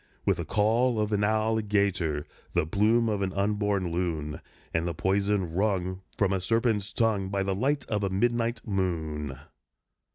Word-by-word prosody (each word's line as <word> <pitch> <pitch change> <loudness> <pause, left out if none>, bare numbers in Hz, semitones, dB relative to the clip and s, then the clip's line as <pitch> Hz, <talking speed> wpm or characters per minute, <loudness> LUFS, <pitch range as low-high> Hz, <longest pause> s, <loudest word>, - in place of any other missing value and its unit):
_With - - +2
the - - -3
caul 115 +3 +2
of 105 0 0
an 105 -1 +1
alligator, 105 -7 +1 0.3
The - - +2
plume 110 +7 +3
of 105 -2 0
an 95 -1 0
unborn 100 -2 0
loon, 80 -3 -2 0.3
And 80 +1 0
the 85 - -3
poison 95 -1 +1
wrung 95 -1 0 0.2
From 100 -1 +2
a 95 - 0
serpent's 110 0 +1
tongue 105 -4 +1
By 100 0 0
the 95 0 0
light 140 +8 0
of 105 -2 -1
a 100 - +1
midnight 115 +3 0
moon! 80 -8 -2
100 Hz, 160 wpm, -28 LUFS, 90-110 Hz, 0.3 s, plume